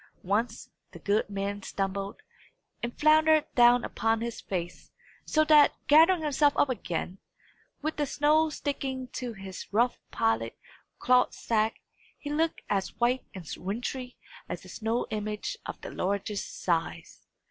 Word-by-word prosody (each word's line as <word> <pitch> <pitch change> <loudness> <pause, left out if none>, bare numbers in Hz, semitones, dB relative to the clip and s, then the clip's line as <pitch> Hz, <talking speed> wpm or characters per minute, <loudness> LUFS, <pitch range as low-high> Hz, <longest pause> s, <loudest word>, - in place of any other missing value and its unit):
Once, 220 +4 -1 0.2
the - - -9
good 205 +1 0
man 200 0 -3
stumbled, 195 - -4 0.6
and 235 0 -5
floundered 310 0 +5
down 240 0 +6
upon 225 0 0
his 235 0 -4
face, 175 -2 -5 0.4
so 310 - +3
that, 300 -2 +6
gathering 325 +3 +6
himself 290 -1 +3
up 285 - +3
again, 185 -5 -3 0.6
with 310 +1 -2
the 295 -1 0
snow 305 +3 +3
sticking 270 -3 -3
to 245 -2 -5
his 190 -2 -9
rough 235 +4 +2
pilot 115 +1 0 0.4
cloth 250 0 +3
sack, 220 -1 0 0.4
he 290 - -6
looked 320 +2 0
as 195 -2 -1
white 245 +2 +1
and 180 -4 -8
wintry 245 +6 -4 0.3
as - - -6
a - - -12
snow 230 +2 -1
image 215 - -3
of - - -6
the - - -7
largest 200 - -3
size. - - -2
240 Hz, 140 wpm, -28 LUFS, 200-290 Hz, 0.6 s, down